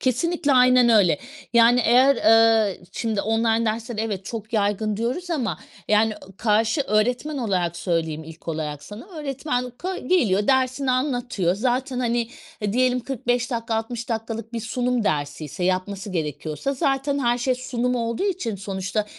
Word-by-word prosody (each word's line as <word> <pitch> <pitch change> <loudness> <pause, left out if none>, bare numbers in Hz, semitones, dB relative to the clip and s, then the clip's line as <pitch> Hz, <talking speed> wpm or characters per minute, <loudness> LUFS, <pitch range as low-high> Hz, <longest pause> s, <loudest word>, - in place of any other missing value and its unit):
kesinlikle, 285 +4 +1
aynen 250 -1 +6
öyle. 200 -9 +4 0.3
Yani 235 +1 +6
eğer, 260 +4 +5
eee, 225 -2 +4
şimdi 220 -3 -1
online 225 +1 +1
dersler, 225 +1 -2
evet, 205 -4 -3
çok 220 +1 -6
yaygın 210 0 0
diyoruz 255 - -3
ama 235 - -1 0.3
yani, 215 +1 +3
ııı, 190 0 -16
karşı 220 - +2
öğretmen 250 +5 0
olarak 180 -8 -1
söyleyeyim 160 -3 -2
ilk 160 +1 -12
olarak 150 -2 -3
sana, 205 - -10
öğretmen 275 -6 -3
ka 370 +10 -5
geliyor 210 - +2
dersini 260 0 +2
anlatıyor 245 - 0
zaten 255 +4 -1
hani, 235 -1 0 0.3
hı, 205 -1 0
diyelim 250 +1 +2
45 245 -1 -1
dakika 230 -2 -2
60 225 +1 -3
dakikalık 225 0 -4
bir 230 - -3
sunum 245 +1 -1
dersiyse 145 +1 -2
yapması 190 +3 -1
gerekiyorsa, 155 - -3
zaten 275 +1 0
her 240 -2 +1
şey 255 +1 +1
sunum 250 -1 -2
olduğu 230 - -1
için 365 - -1
sonuçta, 195 +2 -3
230 Hz, 150 wpm, -23 LUFS, 205-250 Hz, 0.3 s, aynen